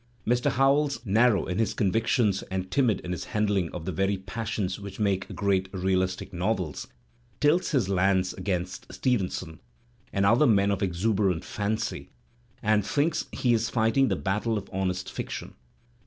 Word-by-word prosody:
Mr. 120 +1 +2
Howells» 140 +1 +3
narrow 110 +1 +3
in 90 +3 -2
his 110 -1 0
convictions 105 0 +1
and 95 0 -3
timid 120 -6 +2
in 90 - -6
his 90 - -4
handling 100 -5 +1
of 85 -2 -6
the 95 - -2
very 95 +3 0
passions 100 0 -3
which 100 0 -9
make 100 -3 0
great 95 -2 +1
realistic 95 0 -1
novels, 90 -3 -2 0.5
tilts 150 +5 +3
his 130 - +1
lance 95 -1 +2
against 90 -2 -4
Stevenson 95 - -1 0.5
and 100 0 +1
other 120 +8 +5
men 100 -3 +4
of 100 - -1
exuberant 95 -1 0
fancy 105 +1 -3 0.5
and 110 -1 +3
thinks 150 - 0
he 120 -2 +1
is 115 0 +1
fighting 115 +4 +2
the - - +1
battle 105 +3 -1
of 100 - -6
honest 95 -1 -1
fiction. - - -6
100 Hz, 155 wpm, -27 LUFS, 95-115 Hz, 0.5 s, other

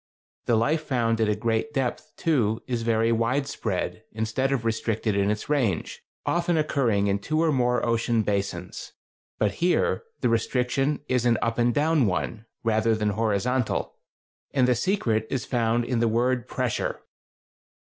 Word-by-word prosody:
The 120 - +4
life 135 +8 +2
found 115 -5 0
at 110 - +2
a 105 - +2
great 115 +7 -1
depth, 135 +3 -2
too, 115 -9 +1
is 120 -2 -2
very 115 0 +2
wide 115 +5 +1
spread, 110 -9 -3
instead 110 +5 -1
of 125 -4 -1
restricted 110 -1 0
in 100 0 +2
its 105 0 -2
range, 125 - 0 0.2
often 175 -1 +1
occurring 125 -9 +1
in 100 0 +1
two 155 +10 -1
or 165 -1 +3
more 125 -3 +1
ocean 115 -1 +1
basins; 100 -4 -3 0.4
but - - +1
here 180 +1 +2 0.2
the - - +2
restriction 125 +5 0
is 125 -2 +1
an 115 - +4
up 115 +1 -1
and 120 0 +3
down 150 -1 +2
one, 105 +4 -3 0.2
rather 110 0 +2
than 105 -1 0
horizontal, 110 +3 0 0.6
and 130 -2 +4
the 125 - +4
secret 115 - 0
is 130 -4 -2
found 120 -1 +1
in 125 -2 0
the 115 - +3
word 120 +2 +1
pressure. 125 -3 -2
115 Hz, 160 wpm, -25 LUFS, 110-130 Hz, 0.6 s, The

